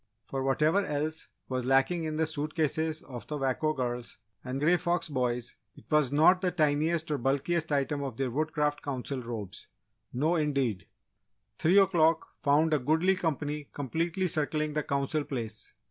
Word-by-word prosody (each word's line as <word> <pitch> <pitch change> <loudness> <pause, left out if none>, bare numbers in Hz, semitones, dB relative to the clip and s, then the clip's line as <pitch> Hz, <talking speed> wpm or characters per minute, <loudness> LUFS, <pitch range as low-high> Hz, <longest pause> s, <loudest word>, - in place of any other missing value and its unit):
For, 135 - -3
whatever 150 +8 +2
else 155 0 -3 0.2
was 130 -1 -2
lacking 135 +6 +3
in 155 -1 -3
the 160 - +2
suitcases 155 +1 -1
of 120 -5 -9
the 150 - -3
Wako 135 +3 0
Girls 120 -4 -4 0.3
and 130 +1 -3
Grey 165 +5 +4
Fox 175 -1 -1
Boys, 125 -3 -2 0.2
it - - -15
was 150 -4 +3
not 160 +6 +5
the 185 - +2
tiniest 160 0 +1
or 145 - 0
bulkiest 145 +6 0
item 140 0 0
of 135 -5 -5
their 135 -2 -1
Woodcraft 150 +1 0
Council 135 -1 -4
Robes! 110 -5 -6 0.4
No 155 +7 +1
indeed! 135 - 0 0.7
Three 175 +5 +4
o'clock 165 -5 +4
found 155 +3 +3
a 150 - +3
goodly 160 +8 +2
company 150 -4 -2
completely 165 - -1
circling 155 -1 0
the 150 - 0
Council 140 +2 -1
Place. 115 -6 -6
150 Hz, 160 wpm, -29 LUFS, 135-160 Hz, 0.7 s, not